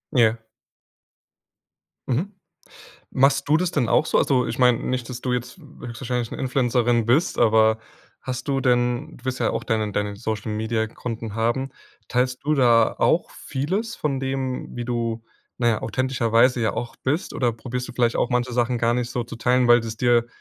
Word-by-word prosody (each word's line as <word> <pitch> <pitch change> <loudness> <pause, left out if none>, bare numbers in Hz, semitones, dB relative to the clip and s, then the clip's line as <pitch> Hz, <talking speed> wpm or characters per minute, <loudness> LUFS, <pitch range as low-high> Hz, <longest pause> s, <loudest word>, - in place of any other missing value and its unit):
Ja. 115 -2 +4 1.7
Mhm. 165 - -1 0.8
Machst 135 +1 +2
du 155 - +5
das 180 0 0
denn 140 -9 0
auch 155 - +3
so? - - +2
Also, 130 -3 +2
ich - - -4
meine, 125 -2 +4
nicht, 125 -2 -3
dass 125 -1 -6
du 125 - -2
jetzt 125 +5 -3
höchstwahrscheinlich 125 -5 -5
'ne - - -6
Influencerin 120 -3 +1
bist. 140 +9 +2
Aber 110 0 +4 0.4
hast 130 +2 -5
du 135 -1 +1
denn 125 +3 0
du 125 - -19
wirst 130 -1 -2
ja - - +2
auch - - -3
deine 110 -3 -1
deine 105 0 -2
Social-Media-Konten 110 +1 -3
haben. 120 +4 0 0.4
Teilst 125 +1 -1
du 155 +1 +2
da 120 -5 +4
auch - - +2
vieles 190 +12 -3
von 140 -3 -1
dem, 135 -1 -3
wie 120 - -3
du, 115 -2 -2 0.4
na 120 -2 +2
ja, 110 - 0
authentischerweise 125 0 +2
ja 110 - +1
auch 120 - -5
bist? 145 +7 -2
Oder 120 -2 +1
probierst 125 +2 -5
du - - -8
vielleicht 120 -2 +1
auch - - 0
manche 125 0 0
Sachen 120 0 +1
gar 115 0 +2
nicht 125 0 -2
so 120 0 -2
zu 120 - -9
teilen, 125 +1 +2
weil 120 - +8
es 115 -1 -5
dir 120 0 +3
125 Hz, 180 wpm, -23 LUFS, 115-130 Hz, 1.7 s, weil